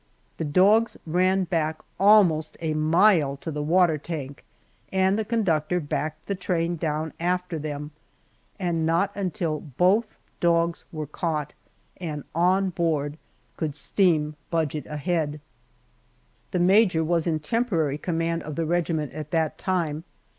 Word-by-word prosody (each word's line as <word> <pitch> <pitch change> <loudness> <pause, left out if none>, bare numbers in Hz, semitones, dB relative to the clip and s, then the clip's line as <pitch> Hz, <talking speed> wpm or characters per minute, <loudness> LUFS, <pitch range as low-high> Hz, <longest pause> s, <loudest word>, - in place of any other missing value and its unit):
The 160 - -2
dogs 200 +9 +4
ran 185 +3 +2
back 160 -3 -1 0.2
almost 190 -7 +4
a 160 -2 -1
mile 155 -2 +3
to 160 - -6
the 150 0 -3
water 165 0 +3
tank, 145 -3 -6 0.5
and 190 0 +2
the 220 - 0
conductor 180 -7 0
backed 155 0 -3
the 200 - -2
train 175 -2 -1
down 155 -1 -2
after 180 -1 -1
them, 150 0 -5 0.7
and 175 -4 -1
not 170 +5 +2
until 180 -5 -2
both 185 - +1 0.2
dogs 170 0 +1
were 155 -2 -4
caught 150 0 -3 0.4
and 155 -5 -5
on 185 +3 +2
board 155 -3 -1 0.4
could 150 -3 -2
steam 155 -1 +1
budge 160 -4 0
it 150 - -5
ahead. 150 -1 -2 1.1
The - - -2
major 185 -2 +4
was 170 +1 0
in 160 -2 +1
temporary 160 - 0
command 165 -1 -1
of 155 -1 -6
the 165 - -1
regiment 160 -3 -1
at 155 -1 -6
that 160 -1 0
time. 165 -5 -1
165 Hz, 140 wpm, -25 LUFS, 155-180 Hz, 1.1 s, dogs